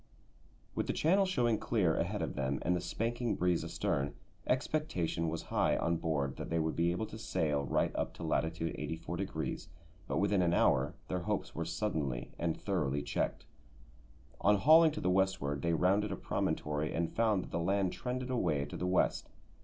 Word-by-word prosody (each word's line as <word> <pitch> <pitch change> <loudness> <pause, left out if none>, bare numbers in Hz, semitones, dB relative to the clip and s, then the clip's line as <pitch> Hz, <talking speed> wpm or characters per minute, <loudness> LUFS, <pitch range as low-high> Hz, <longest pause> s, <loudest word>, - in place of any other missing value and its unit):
With - - -2
the - - 0
channel 190 +5 +3
showing 120 - +2
clear 95 -9 +1
ahead 90 +2 -1
of 70 -6 -3
them 65 +1 -1
and 90 - +2
the 90 - -1
spanking 115 +6 -1
breeze 90 -1 +1
astern, 70 +1 -1 0.3
expectation 125 - 0
was 80 +1 -4
high - - +3
on 85 0 +1
board 70 -4 -1
that - - -5
they 85 - 0
would 80 -1 0
be 85 +1 +2
able 90 +6 -1
to 110 +1 -9
sail 75 -9 0
right - - 0
up - - -1
to - - -8
latitude 80 +2 -1
84°, 85 +3 -4 0.4
but - - -1
within 100 -1 +2
an 85 -1 +2
hour 70 +4 +3
their 90 - -1
hopes 85 - -2
were 85 - -3
suddenly 80 - -2
and 85 -1 -1
thoroughly 75 -8 -1
checked. - - -2 0.9
On 105 +1 +4
hauling 160 +10 +7
to - - -4
the 90 - +2
westward 95 -7 +1
they 85 +2 +1
rounded 100 +5 +2
a - - -1
promontory 75 0 -1
and 85 0 -1
found 110 -4 +2
that - - -11
the 85 - -1
land 95 +2 +1
trended 130 0 -3
away 80 - +1
to - - -7
the 90 - -2
west. 90 0 +1
85 Hz, 185 wpm, -33 LUFS, 80-105 Hz, 0.9 s, hauling